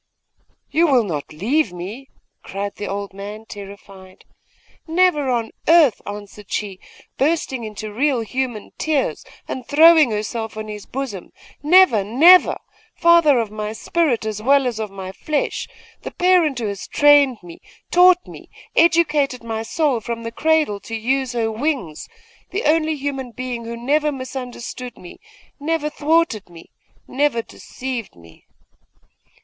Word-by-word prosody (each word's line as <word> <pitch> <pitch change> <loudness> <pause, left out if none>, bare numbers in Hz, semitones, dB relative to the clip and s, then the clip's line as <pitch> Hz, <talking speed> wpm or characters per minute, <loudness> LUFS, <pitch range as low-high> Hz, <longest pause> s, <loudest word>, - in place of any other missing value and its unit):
'You 335 +2 +3
will 260 -5 +4
not 155 -8 -5
leave 225 - 0
me?' 200 +10 -8 0.3
cried 200 +1 -5
the 205 - -5
old 200 0 -5
man, 205 +3 -8
terrified. 195 -2 -12 0.6
'Never 325 -4 +2
on 235 -3 -1 0.2
earth!' 320 -8 +5
answered 205 0 -9
she, 195 -3 -3 0.4
bursting 275 -4 0
into 215 0 -7
real 260 +1 +1
human 245 -1 -4
tears, 305 -4 -1 0.2
and 255 - -5
throwing 315 -1 +6
herself 220 +1 -4
on 215 0 -6
his 210 -1 -8
bosom. 255 -9 -6 0.3
'Never 305 - +5
never! 315 - +6 0.4
father 335 -5 +5
of 225 -3 -1
my 215 0 -4
spirit 265 - 0
as 215 -1 -4
well 275 +3 +3
as 240 -3 -2
of 215 -1 -3
my 190 -1 -8
flesh! 300 +9 -2 0.3
the - - -6
parent 355 -6 +2
who 235 - -3
has 200 -1 -5
trained 290 -4 +5
me, 170 -1 -12 0.3
taught 360 0 +5
me, - - -13 0.3
educated 300 -6 +2
my 225 -1 -4
soul 275 +2 0
from 230 +1 -5
the 230 - -5
cradle 310 -6 +1
to 225 - -7
use 255 +3 -1
her 225 -2 -1
wings! 235 - -3 0.4
the 400 +4 -3
only 315 0 +2
human 270 -3 -4
being 240 0 -6
who 235 0 -6
never 295 +5 +1
misunderstood 255 -2 -7
me 175 - -13 0.4
never 300 0 -1
thwarted 300 - 0
me 170 -1 -15 0.4
never 265 -4 0
deceived 250 -2 -7
me! 85 -1 -19
250 Hz, 145 wpm, -20 LUFS, 210-300 Hz, 0.6 s, throwing